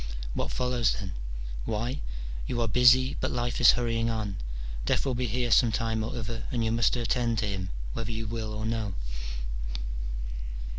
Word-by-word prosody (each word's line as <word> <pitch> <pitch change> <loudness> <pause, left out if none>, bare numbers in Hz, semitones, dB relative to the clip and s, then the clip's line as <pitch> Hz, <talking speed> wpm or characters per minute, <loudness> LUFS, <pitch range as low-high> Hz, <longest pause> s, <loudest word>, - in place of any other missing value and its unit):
What - - -1
follows, 125 -3 +2
then? 95 -2 -4 0.5
Why! 120 +6 -1 0.5
you 120 - -1
are 115 - +2
busy, 125 +3 +6
but - - 0
life 120 0 -1
is 120 - +9
hurrying 115 -1 +1
on: 105 -3 -2 0.5
death - - +2
will 135 - +1
be 125 0 0
here 120 +2 0
some 115 +1 +6
time 110 0 0
or 115 - -3
other, 115 0 -4
and 115 -2 0
you 110 - +2
must 115 +2 +3
attend 120 -1 +1
to 105 - +1
him, 95 -2 -2 0.2
whether 115 0 -3
you 110 0 -3
will 110 0 -3
or 110 0 -3
no. 110 -4 -1
115 Hz, 170 wpm, -29 LUFS, 110-120 Hz, 0.5 s, is